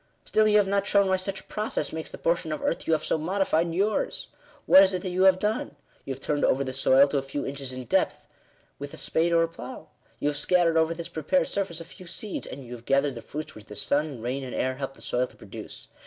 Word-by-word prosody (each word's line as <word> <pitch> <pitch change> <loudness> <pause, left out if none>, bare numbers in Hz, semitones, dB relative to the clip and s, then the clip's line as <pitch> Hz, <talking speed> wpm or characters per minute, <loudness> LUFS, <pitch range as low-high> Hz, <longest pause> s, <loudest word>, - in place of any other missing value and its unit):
" - - -42
Still 215 0 +3
you 210 0 +5
have 205 -2 +4
not 200 0 +1
shown 200 -1 +4
why 190 - +3
such 190 +1 -4
a - - -23
process 210 -8 -3
makes 160 0 -4
the - - -8
portion 170 -1 0
of 155 - -3
earth - - -1
you 165 - +3
have 155 - +1
so - - +1
modified 170 -1 +1
yours. 200 +5 -1 0.4
What 190 - +9
is 195 0 +4
it 180 - -2
that 185 - -3
you 185 +1 +3
have 190 -1 +7
done? 210 - -2 0.3
You 135 - -3
have - - -10
turned 145 -1 0
over 135 - +3
the 130 -1 -4
soil 135 +1 +5
to 140 - +1
a - - -3
few 135 +1 -4
inches 135 -1 -5
in 130 0 -6
depth - - +1 0.5
with 140 0 -7
a - - -12
spade 165 +2 +1
or 165 0 +5
a - - +1
plough; 165 +1 -9 0.3
you - - 0
have 145 - -3
scattered 170 +2 +3
over 160 +1 +3
this 170 0 -5
prepared 270 - 0
surface 185 -5 -2
a 165 - -8
few 180 +2 -13
seeds; 205 +4 -5
and 135 0 -8
you 120 - -12
have 120 -1 -10
gathered 140 +1 +2
the 115 - -8
fruits 150 +6 -6
which 105 - -12
the 105 - -10
sun, 140 -1 -1
rain, 130 +3 -2
and 130 - -6
air, 130 0 -1
helped 135 -1 -5
the - - -12
soil 125 +1 0
to - - -20
produce. - - -10
160 Hz, 270 wpm, -27 LUFS, 135-185 Hz, 0.5 s, What